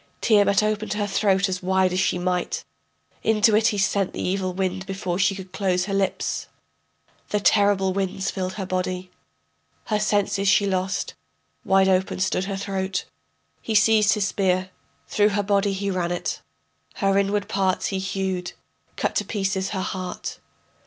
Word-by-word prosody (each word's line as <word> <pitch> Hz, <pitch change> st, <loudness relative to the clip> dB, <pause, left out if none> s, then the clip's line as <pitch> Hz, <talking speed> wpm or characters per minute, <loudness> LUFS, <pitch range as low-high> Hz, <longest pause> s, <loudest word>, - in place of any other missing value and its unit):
Tiamat 205 Hz, -2 st, +4 dB
opened 215 Hz, 0 st, -1 dB
her 210 Hz, 0 st, -1 dB
throat 195 Hz, -1 st, +2 dB
as 185 Hz, -1 st, -3 dB
wide 190 Hz, 0 st, +2 dB
as 185 Hz, -, 0 dB
she 185 Hz, -, +1 dB
might, 180 Hz, 0 st, -2 dB, 0.6 s
Into 220 Hz, 0 st, +3 dB
it 220 Hz, +1 st, +4 dB
he 210 Hz, -, 0 dB
sent 195 Hz, -1 st, +1 dB
the -, -, -6 dB
evil 185 Hz, 0 st, -1 dB
wind 190 Hz, 0 st, -2 dB
before 190 Hz, -2 st, -3 dB
she 195 Hz, 0 st, +3 dB
could 190 Hz, -1 st, -10 dB
close 185 Hz, -3 st, 0 dB
her 195 Hz, -, -4 dB
lips. 195 Hz, -1 st, -1 dB, 0.8 s
The 210 Hz, -, +1 dB
terrible 200 Hz, -2 st, +3 dB
winds 190 Hz, 0 st, -2 dB
filled 185 Hz, -1 st, -3 dB
her 195 Hz, -2 st, -4 dB
body, 185 Hz, 0 st, -3 dB, 0.7 s
Her 210 Hz, -1 st, 0 dB
senses 205 Hz, -1 st, +1 dB
she 200 Hz, +1 st, +4 dB
lost, 190 Hz, -1 st, -1 dB, 0.5 s
wide 190 Hz, 0 st, +4 dB
open 190 Hz, 0 st, +1 dB
stood 190 Hz, 0 st, 0 dB
her 195 Hz, 0 st, -3 dB
throat. 190 Hz, -1 st, -2 dB, 0.6 s
He 220 Hz, -, -3 dB
seized 215 Hz, 0 st, +5 dB
his 210 Hz, -2 st, 0 dB
spear, 185 Hz, -2 st, 0 dB, 0.4 s
through 210 Hz, 0 st, +3 dB
her 205 Hz, 0 st, 0 dB
body 200 Hz, 0 st, +2 dB
he 200 Hz, +1 st, -2 dB
ran 175 Hz, -2 st, -1 dB
it, 175 Hz, -, -3 dB, 0.5 s
Her 195 Hz, -2 st, +1 dB
inward 200 Hz, +1 st, +1 dB
parts 190 Hz, -2 st, 0 dB
he 195 Hz, -, -2 dB
hewed, 190 Hz, -2 st, -3 dB, 0.4 s
cut -, -, -1 dB
to -, -, +1 dB
pieces 195 Hz, -2 st, -1 dB
her 190 Hz, -2 st, -2 dB
heart. 185 Hz, -1 st, -5 dB
195 Hz, 165 wpm, -24 LUFS, 185-205 Hz, 0.8 s, seized